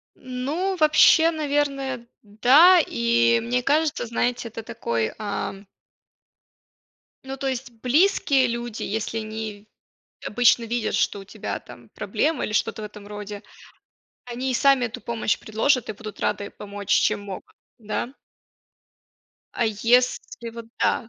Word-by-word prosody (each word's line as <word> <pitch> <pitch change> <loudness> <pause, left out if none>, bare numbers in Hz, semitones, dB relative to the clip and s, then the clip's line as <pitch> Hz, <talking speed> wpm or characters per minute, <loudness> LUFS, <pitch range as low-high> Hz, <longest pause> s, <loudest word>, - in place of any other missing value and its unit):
Ну, 290 +10 -3
вообще, 320 +1 +6
наверное, 280 -5 -2 0.2
да. 270 - +6
И 115 0 +2
мне 125 +2 0
кажется, 305 -4 +1
знаете, 240 +1 -1
это 225 0 -8
такой, 115 - -2
ам 200 -1 -4 1.6
Ну, 265 0 -6
то 270 - -5
есть 260 -1 -3
близкие 270 - +2
люди, 235 -1 -4
если 220 +1 -3
они 215 -1 -6 0.6
обычно 240 +1 +3
видят, 230 -1 -2
что 205 0 0
у - - -11
тебя 195 - -5
там - - -15
проблемы, 320 -1 -1
или - - -4
что-то 215 0 -1
в - - -4
этом 210 -1 -10
роде, 205 0 -7 0.8
они 250 +2 -3
и 255 - -1
сами 275 -1 +4
эту 230 - -8
помощь 230 -2 -1
предложат? 230 +4 0
И - - -2
будут 215 0 -10
рады 205 -1 -1
помочь 205 -1 -9
чем - - +3
могут, 195 -2 -9 0.3
да? 220 +3 -4 1.4
А 235 - +1
если 235 +1 +1
вот, 230 0 -9
да, 230 - +1
235 Hz, 135 wpm, -24 LUFS, 210-265 Hz, 1.6 s, вообще